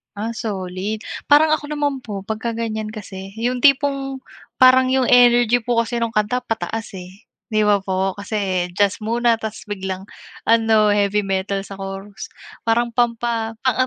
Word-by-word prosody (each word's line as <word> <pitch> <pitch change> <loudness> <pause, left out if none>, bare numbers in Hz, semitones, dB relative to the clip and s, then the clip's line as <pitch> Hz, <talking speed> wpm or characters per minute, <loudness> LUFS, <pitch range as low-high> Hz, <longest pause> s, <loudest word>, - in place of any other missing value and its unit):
Ah, 225 +3 -4
solid. 195 0 -4 0.3
Parang 310 +1 +6
ako 295 -1 -8
naman 285 -3 -1
po 205 -3 -5
pagka 225 +2 -3
ganiyan 220 -2 -3
kasi 195 -2 -8
'yung 245 +1 -1
tipong 275 -1 +2 0.4
parang 255 0 +6
'yung 260 -1 +2
energy 245 -1 +5
po 240 -1 +1
kasi 230 +1 -1
nung 230 - -2
kanta 225 +3 0
pataas, 225 -1 -4
eh, 185 +5 -13 0.2
'di 215 -2 +1
ba, 205 -1 +4
po 190 0 -1
kasi 195 -4 -1
jazz 205 +1 +2
muna 230 +1 +1
tas 220 -1 -6
biglang 190 -2 -5 0.4
ano, 225 -2 +4
heavy 205 0 +1
metal 195 0 -2
sa 195 -1 -10
chorus, 195 +1 -7 0.4
parang 235 +1 +2
pampa 230 -1 -1
ang 255 -3 +2
225 Hz, 155 wpm, -20 LUFS, 200-240 Hz, 0.4 s, Parang